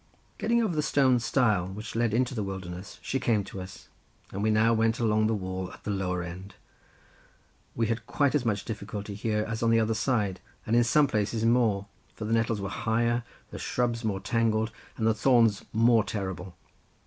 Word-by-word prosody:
Getting 235 +1 +2
over 190 -7 -1
the 155 - +2
stone 130 -4 +3
stile, 110 -6 +2
which 105 +4 -7
led 115 -1 +1
into 125 +3 +1
the 110 - -2
wilderness, 95 -1 -6
she 135 - -1
came 110 -5 +1
to 95 0 -8
us, 95 0 -10 0.4
and 100 - -4
we 110 - +2
now 110 +2 +4
went 115 +1 +2
along 110 -2 +2
the 110 - +1
wall 95 -2 -4
at - - -14
the 105 - -2
lower 90 -2 -1
end; 90 +3 -8 1.2
we 115 - +1
had 115 +1 -2
quite 140 +2 +1
as 150 -4 +2
much 105 -4 -1
difficulty 105 -2 -5
here, 105 +1 -1
as 115 0 -4
on 115 - +3
the 115 0 +4
other 110 0 +1
side, 110 -5 0 0.3
and 110 - +1
in 120 - +5
some 145 +6 +4
places 110 -2 -1
more, 115 -4 +3 0.3
for 110 - -5
the 110 - -1
nettles 115 -1 +1
were 100 - -3
higher, 115 +3 0 0.3
the - - -7
shrubs 120 -1 -1
more 100 -3 -1
tangled, 110 +2 +1 0.3
and 110 - -1
the 115 - +4
thorns 115 -2 +3
more 115 0 +4
terrible. 95 -3 -5
110 Hz, 195 wpm, -28 LUFS, 100-115 Hz, 1.2 s, in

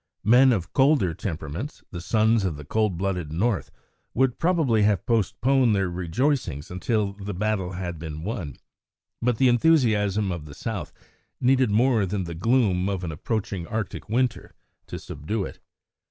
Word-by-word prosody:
Men 125 +5 +6
of 90 -7 -2
colder 135 - +3
temperaments, 90 - -5
the 85 - -6
sons 110 +3 +2
of 90 -5 -1
the 75 - -9
cold 105 +2 0
blooded 90 -4 -2
North, 100 +6 0 0.5
would 130 -1 +1
probably 160 -11 +2
have 105 -3 +2
postponed 120 +2 +2
their 95 -2 0
rejoicings 90 - -1
until 100 +2 -1
the 100 0 -6
battle 95 -2 -1
had 90 -3 -5
been 80 -1 -6
won, 95 - -4 0.7
but 120 -1 +1
the 130 - +4
enthusiasm 110 -7 +3
of 85 -4 -5
the 70 -1 -11
South 100 -10 -5 0.5
needed 130 -1 +3
more 110 -1 +3
than 95 0 -2
the 85 -1 -6
gloom 100 -1 +2
of 95 -2 -3
an 85 - -3
approaching 95 +1 -3
Arctic 110 -3 -4
winter 125 +3 -1 0.3
to - - -6
subdue 95 +8 -4
it. - - -9
105 Hz, 155 wpm, -25 LUFS, 90-120 Hz, 0.7 s, Men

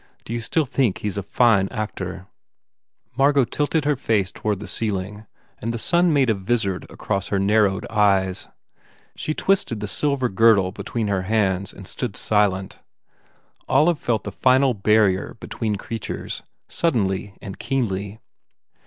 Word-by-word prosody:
Do 115 - -5
you 120 - -1
still 150 +7 0
think 130 -6 +1
he 105 - -3
s 100 - -7
a - - 0
fine 100 -1 +3
actor?" 95 -4 -5 0.9
Margot 140 0 +4
tilted 145 +5 -1
her 150 0 +2
face 105 -6 0
toward 105 -1 -2
the 100 +1 -8
ceiling 105 +1 -3 0.3
and 115 - -3
the 115 - -3
sun 175 +8 +2
made 135 -5 +3
a - - +3
visard 100 -1 -1
across 100 -1 -3
her 100 - 0
narrowed 100 -1 +2
eyes. 100 -4 +2 0.7
She 155 - -3
twisted 190 - +1
the 105 - -4
silver 135 +5 +1
girdle 100 -3 +4
between 110 +3 -4
her 100 -2 0
hands 100 -3 +1
and 100 - -12
stood 120 -7 -4
silent. 100 -3 +1 0.9
Olive 155 +4 +3
felt 115 -3 -1
the 105 - -5
final 130 +4 +3
barrier 105 -1 +2
be - - -9
tween 110 -3 -2
creatures, 110 +2 -5 0.3
suddenly 100 - -1
and 95 - -9
keenly. 105 -6 -2
105 Hz, 155 wpm, -22 LUFS, 95-125 Hz, 0.9 s, Margot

